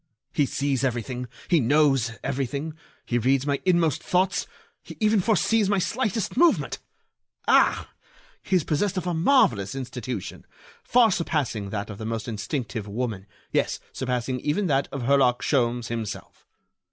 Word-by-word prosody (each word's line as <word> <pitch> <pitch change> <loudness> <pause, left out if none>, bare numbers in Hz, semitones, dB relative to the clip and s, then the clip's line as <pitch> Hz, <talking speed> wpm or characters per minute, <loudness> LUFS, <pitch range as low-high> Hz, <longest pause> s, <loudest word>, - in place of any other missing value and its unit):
He 145 - +2
sees 140 -1 -1
everything; 125 0 -2 0.2
he 170 - +4
knows 135 -3 +3
everything; 140 +3 -2 0.3
he 120 - 0
reads 130 +3 +2
my 140 -1 0
inmost 170 -5 +2
thoughts; 185 +1 +1 0.3
he - - -11
even 215 -1 +3
foresees 215 +1 +2
my 205 - +2
slightest 220 +1 -1
movement. 340 +5 +3 0.7
Ah! - - +4 0.5
he 190 - 0
is 175 - +3
possessed 190 +7 0
of 180 - -2
a 175 - -1
marvellous 160 - +3
intuition, 125 -5 -5 0.4
far 240 -3 +4
surpassing 145 - -1
that 100 +1 -4
of 100 - -9
the 110 - -5
most 115 0 -3
instinctive 110 0 -4
woman, 105 -2 -4 0.2
yes, - - 0
surpassing 125 0 -2
even 150 +10 0
that 140 -4 +1
of 140 -3 -4
Herlock 130 -1 +3
Sholmes 120 -4 +1
himself. 115 -3 -6
135 Hz, 145 wpm, -25 LUFS, 120-175 Hz, 0.7 s, he